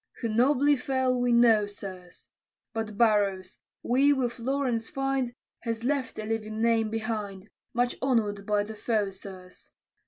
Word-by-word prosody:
Who 230 Hz, -, -1 dB
nobly 275 Hz, +6 st, +4 dB
fell, 255 Hz, -1 st, 0 dB
we 245 Hz, 0 st, +2 dB
know, 230 Hz, -3 st, +5 dB
sirs; 185 Hz, -3 st, -10 dB, 0.5 s
But 220 Hz, -2 st, -4 dB
Burrows, 200 Hz, -5 st, +2 dB, 0.2 s
we 270 Hz, +4 st, +4 dB
with 255 Hz, -3 st, -2 dB
Lawrence 250 Hz, -2 st, -1 dB
find, 270 Hz, -2 st, -1 dB, 0.3 s
Has 230 Hz, -1 st, -4 dB
left 270 Hz, -1 st, -1 dB
a 215 Hz, -, -3 dB
living 215 Hz, 0 st, -3 dB
name 225 Hz, -1 st, +2 dB
behind, 215 Hz, -3 st, -4 dB, 0.2 s
Much 245 Hz, 0 st, +1 dB
honor'd 210 Hz, -6 st, 0 dB
by 210 Hz, -1 st, +2 dB
the 220 Hz, +2 st, -7 dB
foe, 210 Hz, -2 st, -1 dB
sirs. 185 Hz, -1 st, -11 dB
225 Hz, 145 wpm, -28 LUFS, 205-250 Hz, 0.5 s, know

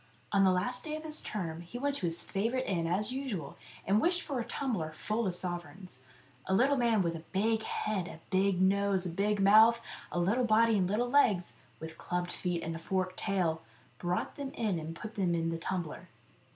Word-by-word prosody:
On 200 Hz, -1 st, +4 dB
the 190 Hz, -, +5 dB
last 245 Hz, +8 st, -1 dB
day 305 Hz, -1 st, -4 dB
of 310 Hz, -, -7 dB
his 310 Hz, -1 st, 0 dB
term 170 Hz, -6 st, -4 dB
he 175 Hz, +8 st, -8 dB
went 285 Hz, +3 st, 0 dB
to 175 Hz, -, -1 dB
his 165 Hz, +1 st, -1 dB
favourite 235 Hz, +6 st, -1 dB
inn 170 Hz, -4 st, -1 dB
as 205 Hz, +6 st, 0 dB
usual 255 Hz, -, -4 dB, 0.3 s
and 205 Hz, +3 st, +3 dB
wished 350 Hz, +1 st, +2 dB
for 275 Hz, -4 st, -3 dB
a -, -, -1 dB
tumbler 225 Hz, -, -2 dB
full 215 Hz, +6 st, -1 dB
of 180 Hz, -, -1 dB
sovereigns. 175 Hz, -4 st, -4 dB, 0.5 s
A 190 Hz, -, +2 dB
little 270 Hz, +7 st, +4 dB
man 230 Hz, -6 st, +2 dB
with 170 Hz, -1 st, -1 dB
a 160 Hz, -, -8 dB
big 220 Hz, +3 st, +1 dB
head, 210 Hz, -4 st, -2 dB
a 160 Hz, -, -9 dB
big 190 Hz, -1 st, +2 dB
nose, 195 Hz, -1 st, +2 dB
and 170 Hz, -2 st, -4 dB
big 205 Hz, +2 st, +1 dB
mouth, 220 Hz, +4 st, +7 dB, 0.3 s
a -, -, -3 dB
little 200 Hz, +9 st, +2 dB
body, 225 Hz, 0 st, +4 dB
and 180 Hz, -1 st, +1 dB
little 225 Hz, +5 st, +1 dB
legs, 215 Hz, -10 st, +3 dB, 0.3 s
with 160 Hz, 0 st, -8 dB
clubbed 175 Hz, 0 st, -2 dB
feet 175 Hz, -2 st, -2 dB
and 165 Hz, 0 st, -3 dB
a -, -, -6 dB
forked 185 Hz, +2 st, -2 dB
tail, 175 Hz, -5 st, 0 dB, 0.4 s
brought 175 Hz, 0 st, -2 dB
them 280 Hz, -2 st, -4 dB
in 205 Hz, -7 st, 0 dB
and 160 Hz, +1 st, -6 dB
put 215 Hz, +5 st, -7 dB
them 180 Hz, -4 st, +1 dB
in 165 Hz, 0 st, 0 dB
the 165 Hz, -, -2 dB
tumbler. 170 Hz, -3 st, -4 dB
195 Hz, 210 wpm, -31 LUFS, 175-230 Hz, 0.5 s, mouth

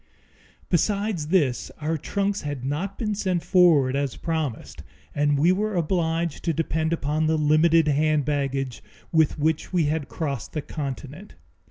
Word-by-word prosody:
Besides 200 Hz, -1 st, 0 dB
this, 150 Hz, -8 st, +1 dB
our 155 Hz, +2 st, -1 dB
trunks 200 Hz, +6 st, -1 dB
had 145 Hz, -4 st, -5 dB
not 170 Hz, +8 st, -3 dB
been 215 Hz, -3 st, -1 dB
sent 185 Hz, -4 st, -1 dB
forward 160 Hz, -8 st, +4 dB
as 140 Hz, -2 st, -1 dB
promised, 160 Hz, -7 st, -4 dB, 0.3 s
and 145 Hz, 0 st, +2 dB
we 165 Hz, +6 st, +4 dB
were 210 Hz, +2 st, 0 dB
obliged 170 Hz, -1 st, -1 dB
to 165 Hz, -, +1 dB
depend 160 Hz, +1 st, -1 dB
upon 155 Hz, -1 st, 0 dB
the 160 Hz, 0 st, +2 dB
limited 155 Hz, +2 st, +4 dB
hand 150 Hz, 0 st, +2 dB
baggage 135 Hz, -3 st, -2 dB, 0.3 s
with 160 Hz, -2 st, +3 dB
which 155 Hz, +1 st, 0 dB
we 180 Hz, -3 st, +2 dB
had 150 Hz, -1 st, -1 dB
crossed 140 Hz, -7 st, -4 dB
the 155 Hz, -, -2 dB
Continent. 150 Hz, +5 st, -7 dB
155 Hz, 150 wpm, -24 LUFS, 145-175 Hz, 0.3 s, forward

